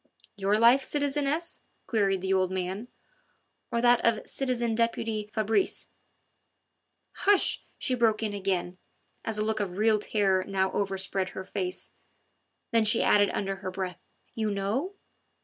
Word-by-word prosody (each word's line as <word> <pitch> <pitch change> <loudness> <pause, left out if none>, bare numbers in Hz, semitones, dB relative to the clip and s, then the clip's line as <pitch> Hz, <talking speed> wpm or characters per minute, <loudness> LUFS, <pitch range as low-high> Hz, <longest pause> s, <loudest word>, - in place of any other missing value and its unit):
"Your 200 0 +1
life, 240 +4 +6
citizeness?" 290 +3 -1 0.3
queried 195 -4 +1
the 190 +1 0
old 185 -1 +2
man, 190 +5 -3 0.8
"or 235 - 0
that 240 0 +4
of 230 -2 +1
citizen 245 -4 -1
deputy 225 -2 -1
Fabrice?" 220 - 0 1.2
"Hush!" 405 -1 +3 0.2
she 255 - -1
broke 225 -3 +2
in 210 -2 -1
again, 185 -2 -2 0.4
as 220 -1 -2
a 215 - 0
look 220 0 -1
of 190 -3 -3
real 215 0 +3
terror 195 -3 +1
now 190 -1 0
overspread 195 -1 -1
her 190 - -3
face. 185 -1 -4 0.8
Then 230 -2 +4
she 220 +2 +4
added 205 -1 +4
under 195 -1 -2
her 190 -1 -5
breath: 185 -2 -4 0.3
"You 220 -1 -1
know?" 210 - -2
210 Hz, 140 wpm, -28 LUFS, 195-235 Hz, 1.2 s, life